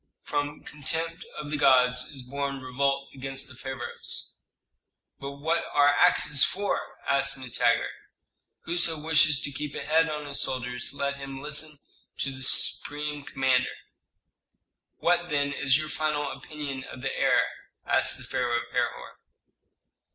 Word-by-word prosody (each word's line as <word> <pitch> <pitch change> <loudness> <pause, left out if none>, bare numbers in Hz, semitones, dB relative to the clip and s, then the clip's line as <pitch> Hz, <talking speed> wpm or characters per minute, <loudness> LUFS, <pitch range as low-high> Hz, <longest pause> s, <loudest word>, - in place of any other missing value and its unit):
From 145 0 -2
contempt 165 +4 -3
of 150 -1 -6
the 150 - 0
gods 125 -2 +5
is 135 -3 -7
born 140 +1 -3
revolt 140 +2 0
against 135 0 -5
the 140 - -12
pharaohs." 130 -1 -6 0.9
"But 140 0 -5
what 160 +4 0
are 145 0 +6
axes 145 0 +5
for?" 200 +1 -1
asked 135 0 +2
Nitager. 120 -2 +1 0.8
"Whoso 170 -2 0
wishes 155 -2 +4
to 145 - -4
keep 145 +1 -5
a - - -4
head 160 +1 +3
on 150 -1 -4
his 140 -1 0
shoulders 125 -1 -3
let 140 0 -2
him 135 -1 -7
listen 150 +1 -1 0.4
to 140 - -1
the 130 0 -8
supreme 145 +2 +2
commander." 130 -3 +1 1.2
"What 175 0 +2
then 145 -1 +1
is 135 -1 +3
your 155 0 -3
final 150 -2 -1
opinion 140 -1 -6
of 130 - -10
the 135 - -2
heir?" - - +4 0.4
asked - - +2
the - - -8
pharaoh 120 -1 0
of 120 0 -5
Herhor. - - -2
140 Hz, 145 wpm, -27 LUFS, 130-150 Hz, 1.2 s, are